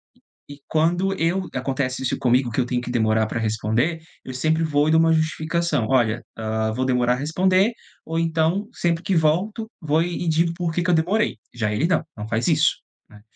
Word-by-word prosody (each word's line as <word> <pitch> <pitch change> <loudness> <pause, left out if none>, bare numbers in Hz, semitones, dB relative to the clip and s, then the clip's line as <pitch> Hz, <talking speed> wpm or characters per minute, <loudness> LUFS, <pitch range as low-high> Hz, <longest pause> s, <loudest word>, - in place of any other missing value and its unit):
E - - -30 0.3
e 145 0 -11
quando 175 +5 +1
eu 180 +3 0
acontece 130 0 -2
isso 125 - -1
comigo, 125 -1 +2
que 130 - 0
eu 120 - -2
tenho 125 -1 0
que 125 - -6
demorar 110 -2 +2
pra 110 +1 -3
responder, 110 +9 0 0.2
eu 130 - -7
sempre 155 +5 0
vou 150 -1 +2
e - - +3
dou 160 - +5
uma 165 0 +4
justificação: 155 -4 0
"olha, 120 -3 +2
hã, 110 0 -1
vou 130 +4 -1
demorar 125 -1 +2
responder" 185 - +2 0.3
ou 165 +1 -2
então, 165 +5 0
sempre 170 -6 -1
que 190 - 0
volto, 185 +8 +1
vou 155 +1 +2
e 175 0 -3
digo 165 +1 +2
porquê 170 -1 -1
que 175 - -1
eu - - +3
demorei. 180 - +1 0.2
Já 110 -3 -1
ele, 145 +10 +1
não. 185 - +1
Não 105 0 -6
faz 110 +1 -1
isso, - - +3 0.3
né. 105 - -16
155 Hz, 200 wpm, -22 LUFS, 125-170 Hz, 0.3 s, dou